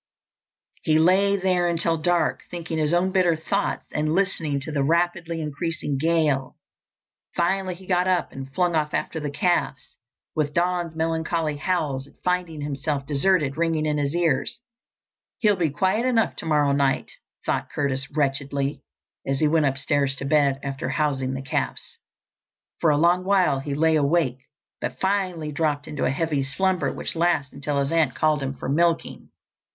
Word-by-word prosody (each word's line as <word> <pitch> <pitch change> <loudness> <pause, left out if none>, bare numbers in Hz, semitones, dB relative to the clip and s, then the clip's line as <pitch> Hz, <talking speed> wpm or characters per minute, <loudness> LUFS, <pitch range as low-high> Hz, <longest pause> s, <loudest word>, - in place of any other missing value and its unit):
He 155 0 +2
lay 190 +5 +4
there 180 -2 +1
until 165 -1 +1
dark, 175 +2 +1
thinking 165 -2 -4
his 150 0 +1
own 175 +2 +2
bitter 180 -3 +3
thoughts 195 +5 -2
and 155 +1 0
listening 165 -7 0
to 155 - -5
the 145 -2 0
rapidly 170 +2 0
increasing 150 -2 -3
gale. 155 -4 +1 0.8
Finally 185 +1 0
he 190 +2 -14
got 180 0 +1
up 180 -2 +1
and 135 0 -8
flung 180 -1 +2
off 150 -1 0
after 160 - -2
the 150 -1 -3
calves, 145 -3 -1 0.4
with 150 -1 -1
Don's 175 -1 0
melancholy 160 -1 -1
howls 145 -5 -1
at - - -21
finding 180 -4 -1
himself 140 0 -2
deserted 150 0 +1
ringing 165 -2 +1
in 150 -1 0
his 145 +2 -1
ears. 170 - 0 0.8
He'll 210 -2 +3
be 170 -4 +1
quiet 190 - +1
enough 230 -3 +2
tomorrow 150 -3 +1
night, 140 -1 +1 0.3
thought - - -1
Curtis 135 -2 -2
wretchedly, 140 -1 -1 0.5
as 135 0 +1
he 155 - +3
went 155 -1 +3
upstairs 135 0 0
to 140 - -4
bed 140 -2 +3
after 140 +1 -3
housing 135 -3 0
the 135 - -5
calves. 130 - -3 0.8
For 165 - +3
a 145 - +3
long 175 +3 +3
while 185 -8 +3
he 140 +1 -4
lay 160 +2 +3
awake, 140 -3 +1 0.4
but - - -4
finally 185 -5 -1
dropped 150 -2 -1
into 150 - -2
a - - +2
heavy 145 0 0
slumber 185 +6 0
which - - -4
lasted 165 -5 0
until 140 +1 -2
his 140 +2 0
aunt 160 -5 +2
called 155 -2 +2
him 135 0 -3
for - - -6
milking. 165 +4 0
155 Hz, 165 wpm, -24 LUFS, 140-175 Hz, 0.8 s, lay